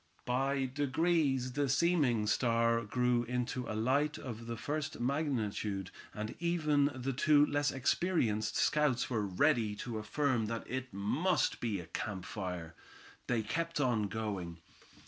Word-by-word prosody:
By 135 +2 +1
degrees 140 -1 +1
the 140 +1 0
seeming 135 -7 +3
star 115 +1 +2
grew 125 +2 +1
into 125 +1 -2
a 110 - -2
light 140 +7 +1
of 115 -3 -7
the 115 0 -4
first 145 +4 -3
magnitude, 115 - -1 0.2
and 105 0 -4
finally - - -11
even 155 -4 +2
the 130 +1 -2
two 145 +2 +5
less 145 -1 +1
experienced 125 - +1
scouts 145 -5 +2
were 110 -4 0
ready 110 +1 +2
to 115 +1 -4
affirm 120 +1 0
that 115 +1 -4
it 130 0 -4
must 120 - +1
be 110 -5 -1
a 85 - -7
camp 95 +2 -4
fire. 90 -5 -5 0.5
They 120 -3 +1
kept 165 +8 -2
on 120 -7 +2
going. 100 -5 -4
125 Hz, 145 wpm, -33 LUFS, 110-145 Hz, 0.5 s, two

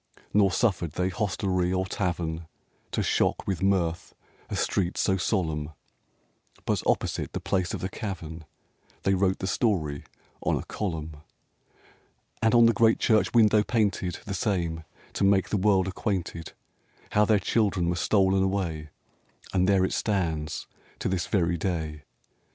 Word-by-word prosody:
Nor 100 -2 +4
suffered 90 -8 0
they 90 +1 0
hostelry 95 -2 -1
or 95 0 0
tavern 85 -4 -2 0.4
To - - 0
shock - - +1
with 95 -5 -2
mirth 90 -4 0 0.3
a - - -3
street 90 -2 0
so 95 - +2
solemn; 80 -6 -1 0.9
But - - 0
opposite - - 0
the - - -2
place 95 -2 -1
of - - -6
the 95 - -1
cavern 85 -7 -6 0.6
They 95 - +2
wrote 95 0 +2
the - - -4
story 85 - 0 0.4
on - - +1
a - - -4
column, 80 -6 -4 1.2
And 110 +2 +3
on 120 -1 +7
the 115 - +5
great 115 +1 +4
church 110 +1 +2
window 110 -2 +6
painted 105 -5 0
The 100 - -4
same, 85 -5 -1 0.3
to - - -1
make 100 -1 +3
the - - 0
world 95 -1 +3
acquainted 95 -4 -3 0.6
How 105 - +4
their 105 0 +4
children 100 -3 +1
were 85 - +1
stolen 95 +2 +2
away, 90 -6 -1 0.6
And 95 0 +2
there 95 -2 +4
it - - -2
stands 80 -7 -1 0.3
to - - -2
this 90 -2 -1
very 85 -3 +1
day. 80 -4 -3
95 Hz, 150 wpm, -27 LUFS, 85-100 Hz, 1.2 s, on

